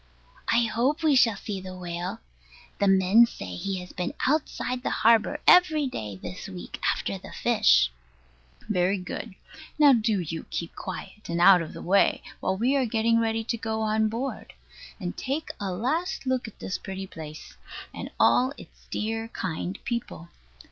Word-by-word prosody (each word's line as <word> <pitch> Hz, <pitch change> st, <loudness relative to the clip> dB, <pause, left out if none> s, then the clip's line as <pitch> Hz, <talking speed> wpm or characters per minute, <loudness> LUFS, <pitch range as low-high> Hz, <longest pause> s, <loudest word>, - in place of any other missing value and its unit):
I 235 Hz, -, +4 dB
hope 245 Hz, +8 st, 0 dB
we 305 Hz, -3 st, +4 dB
shall 230 Hz, -4 st, +5 dB
see 195 Hz, -1 st, -5 dB
the 185 Hz, 0 st, -8 dB
whale. 175 Hz, 0 st, -5 dB, 0.6 s
The 200 Hz, -, +3 dB
men 195 Hz, +4 st, +6 dB
say 90 Hz, -, -7 dB
he 195 Hz, -, -3 dB
has 180 Hz, -, -11 dB
been 180 Hz, -1 st, -3 dB
outside 260 Hz, -3 st, 0 dB
the -, -, -1 dB
harbour 225 Hz, -1 st, +3 dB
every 320 Hz, -5 st, +6 dB
day 105 Hz, -, -5 dB
this 95 Hz, -1 st, -8 dB
week 90 Hz, -1 st, -8 dB
after -, -, -3 dB
the -, -, -11 dB
fish. -, -, +4 dB, 0.8 s
Very 190 Hz, -1 st, +1 dB
good. 185 Hz, +3 st, -6 dB, 0.4 s
Now 290 Hz, -2 st, +7 dB
do 220 Hz, -3 st, +2 dB
you 165 Hz, -1 st, -5 dB
keep 170 Hz, -, -4 dB
quiet, 195 Hz, +2 st, -8 dB
and 170 Hz, 0 st, -1 dB
out 180 Hz, 0 st, +7 dB
of 160 Hz, -, -6 dB
the -, -, -8 dB
way, 195 Hz, +3 st, +3 dB, 0.2 s
while 190 Hz, 0 st, -1 dB
we 250 Hz, +6 st, +2 dB
are 270 Hz, -2 st, +2 dB
getting 230 Hz, +1 st, +2 dB
ready 225 Hz, 0 st, 0 dB
to 235 Hz, +1 st, -2 dB
go 220 Hz, 0 st, -3 dB
on 220 Hz, 0 st, +2 dB
board; 245 Hz, +5 st, -5 dB, 0.5 s
and 180 Hz, -3 st, -4 dB
take 280 Hz, +4 st, -3 dB
a 195 Hz, -2 st, -2 dB
last 275 Hz, -, -2 dB
look 255 Hz, -2 st, 0 dB
at 220 Hz, -, -12 dB
this 185 Hz, -, -4 dB
pretty 190 Hz, 0 st, -6 dB
place, 155 Hz, -4 st, -10 dB, 0.4 s
and -, -, -6 dB
all 260 Hz, +2 st, +4 dB
its -, -, -15 dB
dear 225 Hz, +1 st, -2 dB
kind 185 Hz, -2 st, -4 dB
people. 235 Hz, -8 st, -4 dB
215 Hz, 170 wpm, -26 LUFS, 180-240 Hz, 0.8 s, Now